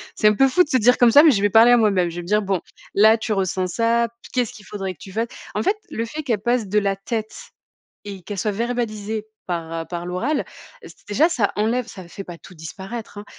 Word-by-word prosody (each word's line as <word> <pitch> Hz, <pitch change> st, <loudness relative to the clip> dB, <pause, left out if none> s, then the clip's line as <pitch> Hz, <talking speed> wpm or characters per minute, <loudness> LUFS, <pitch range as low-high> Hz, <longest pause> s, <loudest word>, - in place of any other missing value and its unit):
c'est 215 Hz, -, +3 dB
un 210 Hz, -, +5 dB
peu 270 Hz, -, +5 dB
fou 360 Hz, +7 st, +4 dB
de -, -, -11 dB
se 260 Hz, -, +3 dB
dire 245 Hz, +1 st, +4 dB
comme 240 Hz, -1 st, +5 dB
ça, 285 Hz, +5 st, +9 dB
mais 315 Hz, -, +7 dB
je 200 Hz, -, +1 dB
vais 205 Hz, -, +3 dB
parler 225 Hz, +4 st, +6 dB
à 245 Hz, -, +7 dB
moi 215 Hz, -3 st, +3 dB
même. 180 Hz, -3 st, +1 dB
Je 170 Hz, -, -9 dB
vais 175 Hz, -, -4 dB
me 170 Hz, -, -11 dB
dire: 210 Hz, +2 st, +2 dB
«Bon, 195 Hz, -3 st, -1 dB, 0.3 s
là, 220 Hz, +3 st, +6 dB
tu 220 Hz, 0 st, -2 dB
ressens 185 Hz, -2 st, -1 dB
ça. 230 Hz, +4 st, +1 dB, 0.2 s
Qu'est-ce 245 Hz, -3 st, -1 dB
qu'il 210 Hz, -, -14 dB
faudrait 195 Hz, -2 st, -5 dB
que 150 Hz, -, -29 dB
tu 190 Hz, -, -11 dB
fasses?» 225 Hz, +4 st, -1 dB, 0.3 s
en 210 Hz, -, 0 dB
fait, 410 Hz, -, +2 dB
le 230 Hz, -, -3 dB
fait 300 Hz, +6 st, -6 dB
qu'elle 230 Hz, -6 st, 0 dB
passe 240 Hz, -1 st, 0 dB
de 210 Hz, +2 st, +3 dB
la 200 Hz, -1 st, 0 dB
tête 220 Hz, +2 st, -4 dB, 0.7 s
et 200 Hz, -2 st, -7 dB
qu'elle 205 Hz, +3 st, -6 dB
soit 210 Hz, -, 0 dB
verbalisée 220 Hz, -1 st, -3 dB, 0.2 s
par 165 Hz, -2 st, -4 dB
par 175 Hz, -1 st, -5 dB
l'oral, 235 Hz, +12 st, -1 dB, 0.4 s
j -, -, -11 dB, 0.2 s
déjà 285 Hz, +11 st, +3 dB
ça 225 Hz, -11 st, 0 dB
enlève 230 Hz, +3 st, 0 dB
ça 190 Hz, -6 st, -10 dB
fait 195 Hz, +3 st, -8 dB
pas 175 Hz, -, -9 dB
tout -, -, -15 dB
disparaître, 195 Hz, +8 st, -8 dB
hein, 205 Hz, -, -8 dB
210 Hz, 255 wpm, -22 LUFS, 195-235 Hz, 0.7 s, ça